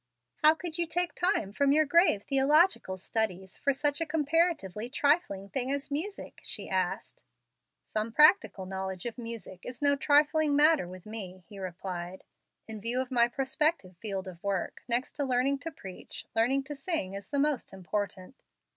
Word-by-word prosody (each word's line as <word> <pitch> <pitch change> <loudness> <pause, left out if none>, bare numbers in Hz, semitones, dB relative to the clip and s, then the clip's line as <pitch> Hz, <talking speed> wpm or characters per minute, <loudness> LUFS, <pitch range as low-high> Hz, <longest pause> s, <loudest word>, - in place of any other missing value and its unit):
"How 310 +1 +6
could 340 -1 -5
you 340 - 0
take 355 +1 0
time 350 - 0
from 280 +4 +3
your 310 +2 +4
grave 310 - +4
theological 275 - +3
studies 190 -2 -2
for 280 - +1
such 290 +3 0
a - - +1
comparatively 300 - 0
trifling 285 - +1
thing 260 +2 -1
as 280 0 -3
music?" 355 +8 -4
she - - -5
asked. - - -2 0.6
"Some 215 +1 -3
practical 300 - +5
knowledge 190 -1 -5
of 240 +1 -5
music 230 -6 -7
is 250 -1 -7
no 285 -1 +3
trifling 295 +1 +3
matter 300 - +5
with 185 0 -11
me," 190 -4 -7
he 205 -2 -11
replied. 185 0 -6 0.4
"In 220 -2 -7
view 235 +4 0
of 260 0 -3
my 235 -2 +4
prospective 265 - 0
field 195 0 -4
of 175 -2 -9
work, 200 -2 -2
next 245 +2 +1
to 290 - +1
learning 265 +1 +1
to 330 - -6
preach, 190 -11 -9
learning 255 +5 +2
to 290 +2 -7
sing 275 - -2
is 200 0 -7
the 285 - -1
most 285 -3 0
important. 190 +3 -5
255 Hz, 170 wpm, -30 LUFS, 195-300 Hz, 0.6 s, How